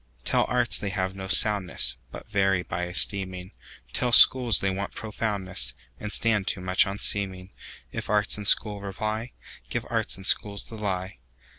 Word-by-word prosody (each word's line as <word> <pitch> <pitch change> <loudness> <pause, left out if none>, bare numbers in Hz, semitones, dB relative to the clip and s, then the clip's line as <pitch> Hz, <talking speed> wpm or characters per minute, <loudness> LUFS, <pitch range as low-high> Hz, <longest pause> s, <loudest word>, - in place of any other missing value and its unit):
Tell - - +2
arts 120 -6 +1
they 100 - -3
have 95 -1 -2
no 95 0 -6
soundness, 95 -2 +3 0.2
But - - -9
vary 95 -3 +1
by 90 +1 -4
esteeming; 95 0 -3 0.4
Tell 125 -1 0
schools 120 -4 +7
they 95 - 0
want 95 +1 -5
profoundness, 95 - -3 0.2
And 105 - -5
stand 105 -4 0
too - - 0
much 90 +1 +2
on 100 +1 -4
seeming:If 95 -2 -2
arts 105 -1 +1
and 105 -1 -6
schools 105 -2 +2
reply, 110 +4 -4 0.4
Give - - -2
arts - - -1
and 95 - -11
schools 100 0 +1
the 115 - -10
lie. 95 - -4
100 Hz, 160 wpm, -26 LUFS, 95-105 Hz, 0.4 s, schools